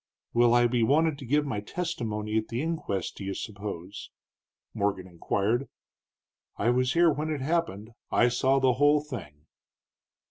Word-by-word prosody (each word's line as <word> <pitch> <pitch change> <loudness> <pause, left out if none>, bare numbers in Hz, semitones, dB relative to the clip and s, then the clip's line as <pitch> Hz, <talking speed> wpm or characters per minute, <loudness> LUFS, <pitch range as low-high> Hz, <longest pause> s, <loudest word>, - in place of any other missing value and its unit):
"Will 120 0 +4
I 120 0 +5
be 120 0 +1
wanted 145 +5 +2
to 135 - -9
give 145 +3 +2
my 120 -7 -2
testimony 110 -6 -3
at 110 0 0
the 115 - -3
inquest, 155 - -3
do - - -7
you 95 0 -3
suppose?" 100 -3 -7 0.6
Morgan 100 -2 -1
inquired. 100 +8 -1 0.9
"I 115 +3 +2
was 125 +1 +1
here 170 -1 +5
when 150 +2 -3
it 150 -3 -2
happened; 135 - -1 0.2
I 120 - +4
saw 130 +3 +2
the 130 -1 +3
whole 145 +3 +4
thing." 75 - -9
120 Hz, 155 wpm, -28 LUFS, 105-145 Hz, 0.9 s, I